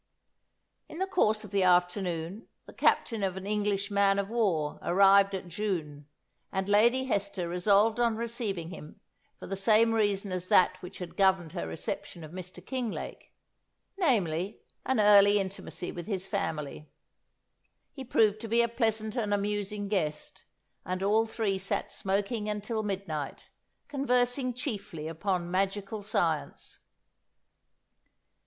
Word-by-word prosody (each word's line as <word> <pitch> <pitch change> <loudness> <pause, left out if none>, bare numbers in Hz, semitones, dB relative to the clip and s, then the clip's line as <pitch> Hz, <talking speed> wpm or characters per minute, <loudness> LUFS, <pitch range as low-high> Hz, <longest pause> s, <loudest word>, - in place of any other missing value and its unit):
In 315 - -9
the 380 - 0
course 220 - +1
of 210 - -10
the 200 -1 +2
afternoon, 180 +1 +1 0.2
the - - -13
captain 225 -3 +1
of 190 -1 -1
an 190 - -6
English 205 -1 -1
man 200 -1 +3
of 200 0 -1
war 180 -11 0
arrived 195 +2 +5
at 185 -1 -6
Djoun, 160 -6 -3 0.4
and 190 0 -2
Lady 235 +6 +4
Hester 200 -6 -1
resolved 200 +6 +3
on 235 -2 +2
receiving 225 -7 -3
him 155 -4 -10 0.4
for - - -9
the 195 - -4
same 220 +3 +4
reason 205 -3 +1
as 185 0 -3
that 185 0 +4
which 180 +2 -8
had 180 -2 -7
governed 190 -4 +2
her 85 - -3
reception 120 - -5
of 155 - -10
Mr. 185 0 -9
Kinglake, 250 -5 -5 0.6
namely, 200 - 0 0.3
an 265 -3 +2
early 205 -1 +7
intimacy 190 -2 -4
with 175 -1 -7
his 190 -3 -2
family. 155 -7 -4 1.0
He 270 - -8
proved 215 -4 +2
to 230 - -5
be 230 +2 +3
a - - +2
pleasant 225 -2 -1
and 220 -5 -1
amusing 205 0 -1
guest, 160 -7 -3 0.4
and 185 +1 -3
all 220 +3 +3
three 215 -4 -1
sat 195 - -2
smoking 205 +3 -1
until 210 +2 -2
midnight, 190 -9 -4 0.4
conversing 250 -2 0
chiefly 200 - -5
upon 175 +1 -2
magical 195 +3 -1
science. 170 -7 -2
200 Hz, 140 wpm, -29 LUFS, 185-220 Hz, 1.0 s, early